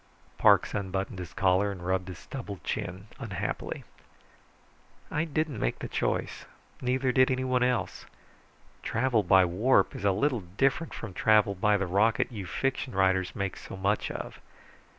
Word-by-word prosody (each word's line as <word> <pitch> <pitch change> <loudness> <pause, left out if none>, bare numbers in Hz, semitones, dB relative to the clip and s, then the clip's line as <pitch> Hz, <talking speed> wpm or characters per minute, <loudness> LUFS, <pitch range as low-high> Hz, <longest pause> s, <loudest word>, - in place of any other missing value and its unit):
Parks - - +5
unbuttoned 95 -1 -3
his 90 -1 -7
collar 95 +1 +2
and 90 -3 -8
rubbed 95 0 0
his 90 -2 -7
stubbled 105 -7 -8
chin 95 -2 -4
unhappily. - - -4 1.3
"I 155 +2 0
didn't 155 -5 -2
make - - -1
the - - -5
choice. - - -2 0.4
Neither 130 +1 +1
did 130 0 +4
anyone 130 -1 +1
else. 125 0 -1 0.7
Travel 115 -1 +1
by 95 0 +5
warp 105 +10 +2
is - - -7
a 100 - +4
little 125 +6 +1
different 135 - 0
from 110 -5 -7
travel 105 +1 +4
by 105 +2 +2
the 100 - -1
rocket 105 +7 +2
you 100 -5 -6
fiction 135 +4 -2
writers 95 -1 +2
make 100 -2 -2
so - - -9
much 100 +2 0
of. - - -6
100 Hz, 150 wpm, -28 LUFS, 95-125 Hz, 1.3 s, Parks